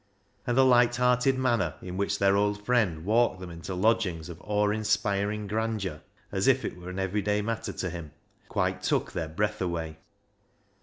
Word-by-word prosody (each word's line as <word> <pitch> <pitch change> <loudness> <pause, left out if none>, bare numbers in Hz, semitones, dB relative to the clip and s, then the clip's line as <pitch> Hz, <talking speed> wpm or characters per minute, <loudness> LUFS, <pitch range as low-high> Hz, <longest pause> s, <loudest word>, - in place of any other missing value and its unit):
And 120 0 +1
the 135 - +6
light 120 -1 +5
hearted 125 +2 +3
manner 120 -10 +1
in 90 0 -7
which 100 +1 0
their 100 0 +3
old 105 0 0
friend 100 -10 +1
walked 110 -2 +2
them 90 -2 -8
into 85 +3 -6
lodgings 90 -5 +1
of 85 +1 -9
awe 105 0 +1
inspiring 105 -1 0
grandeur, 105 -6 -2 0.3
as - - 0
if - - +4
it - - -4
were 90 0 -9
an 90 - -6
everyday 105 +2 0
matter 115 +1 -3
to 90 - -3
him, 85 -3 -7 0.4
quite - - 0
took - - 0
their 80 -2 -3
breath 105 +6 -1
away. 80 -3 -3
105 Hz, 175 wpm, -28 LUFS, 90-110 Hz, 0.4 s, the